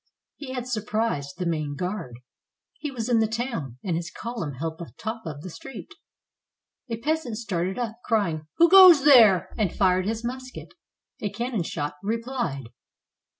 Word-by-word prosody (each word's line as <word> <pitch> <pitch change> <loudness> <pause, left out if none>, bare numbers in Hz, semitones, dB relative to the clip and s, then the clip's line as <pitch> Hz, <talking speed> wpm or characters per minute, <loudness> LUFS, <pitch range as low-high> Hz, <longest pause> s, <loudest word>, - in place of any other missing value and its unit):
He 260 -3 -7
had 250 -1 -4
sur 235 -4 -2
prised 210 -8 -2
the 180 - -3
main 155 -4 -2
guard. 170 - -5 0.6
He 300 - -3
was 240 -4 -4
in 240 -2 +3
the 220 - +3
town, 220 - -4
and 180 -4 -1
his 165 0 -3
column 210 - -5
held 160 +4 -4
the 170 - -8
top 225 -3 -5
of 145 -2 -6
the 185 - -6
street. 270 +8 -10 1.0
A 230 - -2
peasant 270 -2 -2
started 190 -5 -2
up, 230 -2 -4
crying, 170 -9 0
"Who 340 - +7
goes 355 -5 +9
there?" 225 - +6
and 200 -6 +1
fired 185 -1 +2
his 225 +1 -2
musket; 255 +1 -7 0.5
a 205 - -1
cannon 235 +1 -2
shot 145 -3 -4
replied. 225 - -3
215 Hz, 165 wpm, -25 LUFS, 170-240 Hz, 1.0 s, goes